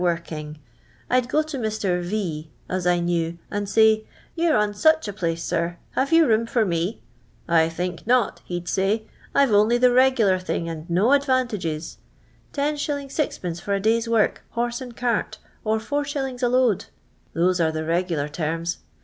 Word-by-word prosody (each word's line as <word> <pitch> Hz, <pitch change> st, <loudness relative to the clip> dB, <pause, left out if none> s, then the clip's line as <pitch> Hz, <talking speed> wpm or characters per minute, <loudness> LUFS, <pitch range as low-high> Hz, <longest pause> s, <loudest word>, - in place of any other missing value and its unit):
jrkinif. 165 Hz, -3 st, -2 dB, 0.6 s
I 255 Hz, -, +5 dB
'd 250 Hz, 0 st, -5 dB
go 305 Hz, +4 st, +2 dB
to 305 Hz, -3 st, -5 dB
Mr. 210 Hz, -5 st, -1 dB
V 175 Hz, -5 st, -3 dB, 0.2 s
as 185 Hz, -1 st, -2 dB
I 175 Hz, 0 st, +3 dB
knew, 170 Hz, -1 st, -1 dB
and 205 Hz, -1 st, -2 dB
say, 220 Hz, +1 st, +4 dB, 0.2 s
* -, -, -30 dB
You 335 Hz, 0 st, +1 dB
're -, -, +4 dB
on 210 Hz, -1 st, +1 dB
such 315 Hz, +5 st, +3 dB
a 205 Hz, -, -4 dB
place, 170 Hz, -4 st, -2 dB
sir, 170 Hz, +1 st, -1 dB
have 275 Hz, +3 st, -1 dB
you 330 Hz, 0 st, +6 dB
room 230 Hz, -2 st, +2 dB
for 230 Hz, -2 st, +1 dB
me 175 Hz, +4 st, -2 dB, 0.4 s
V 170 Hz, -, -3 dB
• -, -, +5 dB
I 160 Hz, 0 st, +5 dB
think 175 Hz, +2 st, -4 dB
not.' 245 Hz, -2 st, +2 dB
he 175 Hz, -1 st, -4 dB
*d -, -, -18 dB
say, 195 Hz, +5 st, 0 dB, 0.2 s
* -, -, -26 dB
I 280 Hz, -, +6 dB
"ve 235 Hz, -, -1 dB
only 215 Hz, +4 st, +4 dB
the 250 Hz, 0 st, +4 dB
regular 245 Hz, -7 st, +4 dB
thing 180 Hz, -2 st, -3 dB
and 165 Hz, +1 st, -6 dB
no 190 Hz, +9 st, +3 dB
advantages 240 Hz, -, 0 dB, 0.3 s
— -, -, -34 dB
10*. 290 Hz, +1 st, 0 dB
6t/. 280 Hz, -, -3 dB
for 200 Hz, +2 st, -1 dB
a -, -, 0 dB
day's 225 Hz, +3 st, +1 dB
work, 225 Hz, -2 st, +2 dB
hor.se 240 Hz, +2 st, -1 dB
and 245 Hz, -2 st, -11 dB
cart, 240 Hz, -3 st, -1 dB, 0.3 s
or 220 Hz, 0 st, +1 dB
4*. 275 Hz, +1 st, -3 dB
a 245 Hz, -, +3 dB
load.' 245 Hz, -5 st, +2 dB, 0.5 s
Those 180 Hz, +2 st, +2 dB
are 160 Hz, -1 st, +2 dB
the 155 Hz, 0 st, -3 dB
regular 165 Hz, -3 st, 0 dB
terms. 165 Hz, +3 st, -3 dB
205 Hz, 195 wpm, -23 LUFS, 170-250 Hz, 0.6 s, you